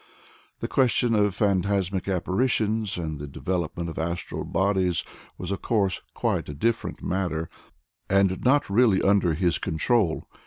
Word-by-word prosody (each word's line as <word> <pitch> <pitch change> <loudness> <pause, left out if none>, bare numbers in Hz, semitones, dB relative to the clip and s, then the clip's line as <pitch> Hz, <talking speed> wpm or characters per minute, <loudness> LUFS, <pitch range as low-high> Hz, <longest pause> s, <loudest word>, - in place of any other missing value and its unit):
The - - -1
question 120 -2 +2
of 105 -3 +2
phantasmic 100 -2 0
apparitions, 105 +2 0
and 80 -4 -4
the 75 - -6
development 85 +3 -3
of 80 - -5
astral 85 +2 -3
bodies, 95 -1 +1 0.3
was 90 +1 -5
of 100 - -3
course 100 -6 0
quite - - -1
a 75 - -5
different 115 +10 -1
matter, 85 -3 -1 0.6
and 95 -1 +4 0.4
really 105 -1 +4
not - - +1
under 95 -5 +3
his 90 0 +1
control. 90 +2 0
95 Hz, 140 wpm, -25 LUFS, 85-105 Hz, 0.6 s, and